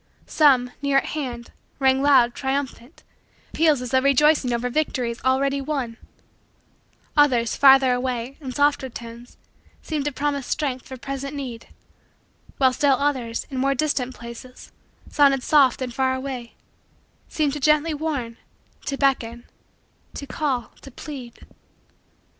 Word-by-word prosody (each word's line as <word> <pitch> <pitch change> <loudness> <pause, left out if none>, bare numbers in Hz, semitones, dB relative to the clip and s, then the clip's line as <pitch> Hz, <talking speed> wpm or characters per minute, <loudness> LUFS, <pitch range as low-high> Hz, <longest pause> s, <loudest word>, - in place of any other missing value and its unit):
Some, 260 -5 +3
near 280 -1 +2
at 275 - +2
hand, 245 -6 -5 0.3
rang 265 -1 +3
loud, 265 -4 +4
triumphant, 270 0 -4 0.5
peals 305 -5 +2
as 250 - -6
though 260 -1 +3
rejoicing 280 -1 +3
over 240 +1 -1
victories 250 -3 -2
already 275 +2 +1
won; 265 -5 -3 1.2
others, 250 -6 +3
farther 270 -2 +6
away, 250 0 -3
in 265 -3 -6
softer 285 -1 +1
tones, 235 0 -11 0.5
seemed 300 -3 -3
to 295 - 0
promise 280 -1 -2
strength 270 -5 -2
for 260 - -8
present 275 +2 -6
need; 250 -5 -7 0.9
while 260 -2 +3
still 280 0 +3
others, 255 -5 -2
in 260 - -3
more 275 +1 +1
distant 260 -3 -1
places, 235 +2 -11 0.4
sounding 275 -3 +3
soft 270 -2 +3
and 250 -2 -5
far 260 0 +1
away, 260 -3 -6 0.7
seemed 295 -3 0
to 295 - -4
gently 305 +2 +2
warn, 285 -7 -3 0.5
to 275 - -2
beckon, 240 -4 0 0.7
to 280 - -6
call, 270 -3 -2
to - - -11
plead. 255 -3 -9
265 Hz, 135 wpm, -23 LUFS, 245-285 Hz, 1.2 s, farther